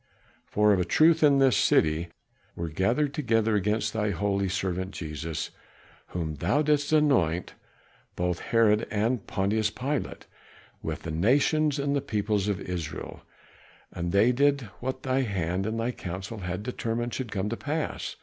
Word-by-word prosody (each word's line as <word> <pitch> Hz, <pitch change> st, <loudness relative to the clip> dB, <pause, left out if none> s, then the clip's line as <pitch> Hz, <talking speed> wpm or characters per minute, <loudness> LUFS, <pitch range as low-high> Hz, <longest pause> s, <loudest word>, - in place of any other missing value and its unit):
"For 105 Hz, 0 st, +3 dB
of 95 Hz, -, +2 dB
a -, -, +2 dB
truth, 160 Hz, -, +4 dB
in 145 Hz, -2 st, +6 dB
this 135 Hz, -4 st, +4 dB
city 80 Hz, -2 st, +3 dB, 0.5 s
were 85 Hz, -1 st, -4 dB
gathered 115 Hz, -, +1 dB
together 115 Hz, -6 st, +1 dB
against 105 Hz, +1 st, 0 dB
thy 105 Hz, -1 st, 0 dB
holy 100 Hz, 0 st, 0 dB
servant 95 Hz, 0 st, -2 dB
Jesus, 80 Hz, 0 st, -4 dB, 0.6 s
whom 80 Hz, -4 st, -4 dB
thou 145 Hz, -, +1 dB
didst 145 Hz, -1 st, +1 dB
anoint, 125 Hz, -, +2 dB, 0.6 s
both 90 Hz, -1 st, -1 dB
Herod 110 Hz, -2 st, +2 dB
and 110 Hz, +1 st, -1 dB
Pontius 105 Hz, +3 st, +1 dB
Pilate, 135 Hz, +7 st, -3 dB, 0.6 s
with -, -, -4 dB
the 80 Hz, -, -4 dB
nations 140 Hz, -, +2 dB
and 140 Hz, 0 st, 0 dB
the 140 Hz, -, +1 dB
peoples 105 Hz, -3 st, -1 dB
of 100 Hz, -3 st, -1 dB
Israel. 85 Hz, -4 st, -5 dB, 0.7 s
And 85 Hz, 0 st, -3 dB
they 105 Hz, +6 st, +4 dB
did 140 Hz, +2 st, +3 dB, 0.2 s
what 130 Hz, +1 st, -4 dB
thy 130 Hz, 0 st, +1 dB
hand 95 Hz, -4 st, -1 dB
and 110 Hz, +1 st, -2 dB
thy 115 Hz, +2 st, 0 dB
counsel 95 Hz, +1 st, -6 dB
had 90 Hz, +1 st, -4 dB
determined 120 Hz, 0 st, -3 dB
should 125 Hz, -5 st, -4 dB
come 100 Hz, 0 st, -1 dB
to 115 Hz, -, -2 dB
pass. 150 Hz, +1 st, -3 dB
105 Hz, 155 wpm, -27 LUFS, 90-130 Hz, 0.7 s, in